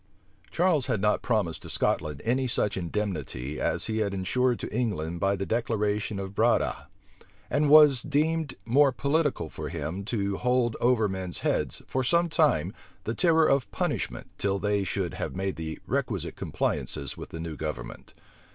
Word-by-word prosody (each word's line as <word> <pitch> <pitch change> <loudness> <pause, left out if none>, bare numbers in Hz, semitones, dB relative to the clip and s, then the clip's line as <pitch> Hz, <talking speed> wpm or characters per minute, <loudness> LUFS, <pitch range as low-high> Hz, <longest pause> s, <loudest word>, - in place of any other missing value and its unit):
Charles 165 - +2
had 110 - 0
not 105 +1 +2
promised 105 -9 0
to - - -10
Scotland 75 -2 -1
any 130 +3 +1
such 105 -3 0
indemnity 80 -7 -3
as - - 0
he 110 0 -1
had 100 -2 0
insured 120 +6 +1
to - - -5
England 85 -9 -1
by 100 +2 +2
the 100 0 -3
declaration 105 -2 -1
of 95 0 -5
Breda: - - +1 0.6
and 150 +1 +2
it - - +3
was 145 -4 +7
deemed 155 +3 0
more 135 +4 +5
political 140 - 0
for - - -6
him 80 +7 -4
to 100 -3 -1
hold 125 -2 +1
over 120 -3 +3
men's 95 -2 -4
heads, - - 0
for 130 - -1
some 170 +6 +2
time, 110 - +2 0.3
the 110 - -2
terror 160 +1 +4
of 135 -4 +2
punishment, - - -2
till 100 -1 +1
they 105 0 0
should 95 -3 -2
have - - -4
made 95 0 -2
the 80 -1 -5
requisite - - -2
compliances - - -2
with - - -9
the 85 - -7
new 80 -1 -5
government. 70 -6 -6
105 Hz, 170 wpm, -27 LUFS, 95-130 Hz, 0.6 s, was